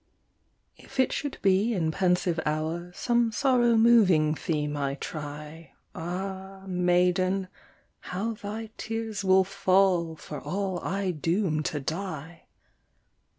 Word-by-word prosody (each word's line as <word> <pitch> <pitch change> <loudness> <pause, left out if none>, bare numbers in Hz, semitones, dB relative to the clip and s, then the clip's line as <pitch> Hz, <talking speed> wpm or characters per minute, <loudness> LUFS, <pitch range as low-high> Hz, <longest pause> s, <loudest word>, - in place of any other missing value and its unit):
If 270 - -12
it 260 - +4
should 285 -2 -3
be 200 +4 +3
in 160 -4 0
pensive 180 -1 +1
hour 160 +3 -2
Some 235 +4 +1
sorrow 240 0 +3
moving 205 -10 +5
theme 150 -2 -2
I 140 -1 -1
try, 150 +2 -7 0.2
Ah, 190 +3 -5
maiden, 180 +1 +2 0.5
how 205 +6 -3
thy 215 +1 -6
tears 225 -2 -3
will 190 0 +5
fall, 185 -3 +2
For 150 -1 -8
all 190 -1 -2
I 195 +1 -1
doom 165 0 0
to 150 - -3
die! 160 +1 -5
185 Hz, 115 wpm, -27 LUFS, 160-200 Hz, 0.5 s, moving